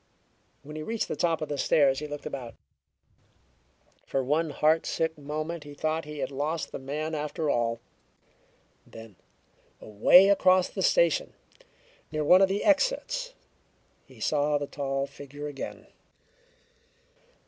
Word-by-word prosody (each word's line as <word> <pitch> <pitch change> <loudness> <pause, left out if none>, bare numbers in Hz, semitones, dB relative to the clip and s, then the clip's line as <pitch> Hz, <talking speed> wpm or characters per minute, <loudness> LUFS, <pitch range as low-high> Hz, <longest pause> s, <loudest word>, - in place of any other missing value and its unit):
When 150 +2 -10
he 155 - -5
reached 225 +7 -2
the - - -2
top 165 -2 0
of 155 - -6
the 145 -1 -3
stairs 135 -2 +3
he 150 - -5
looked 145 0 -7
about. 130 -6 -6 1.5
For 135 - -2
one 155 +5 0
heartsick 160 +2 +1
moment 155 +3 -5
he 145 0 -11
thought 155 +2 -2
he 150 0 -8
had 135 -1 -3
lost 150 +4 -3
the - - -6
man 150 +4 -4
after 150 0 -2
all. 115 -1 0 1.1
Then, 115 -3 -12 0.6
away 175 - +6
across 185 -2 +4
the - - -5
station, - - +2 0.8
near 155 0 -1
one 180 +5 +6
of 195 - +5
the 200 +2 -1
exits, - - +1 0.7
he - - -18
saw 150 0 +1
the 145 - -3
tall 135 -1 -3
figure 145 +1 -10
again. 145 -2 -7
150 Hz, 135 wpm, -27 LUFS, 140-165 Hz, 1.5 s, away